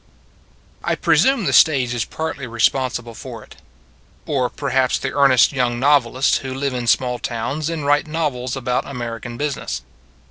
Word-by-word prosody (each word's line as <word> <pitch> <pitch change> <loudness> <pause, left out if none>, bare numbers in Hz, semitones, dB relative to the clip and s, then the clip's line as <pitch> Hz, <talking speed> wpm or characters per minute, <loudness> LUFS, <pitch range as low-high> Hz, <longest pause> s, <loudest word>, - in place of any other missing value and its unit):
1 - - 0
PRESUME 265 -6 +3
the - - 0
stage 130 -6 +4
is 120 -3 -1
partly 160 -5 -5
re 115 0 -9
sponsible 125 -2 +1
for - - -9
it. - - -16 0.7
Or 130 -4 0
perhaps 130 -2 0
the 135 - -3
ear 140 0 +4
nest 130 -3 +5
young 120 -3 0
novelists 135 -2 +3
who 130 -1 -6
live 135 0 -2
in 120 -1 -3
small 125 +1 +2
towns 135 +8 -3
and 160 -3 -4
write 145 +2 +2
novels 140 -6 -2
about 125 -1 -2
American 120 -2 -6
business. 140 - -3
130 Hz, 165 wpm, -20 LUFS, 120-145 Hz, 0.7 s, nest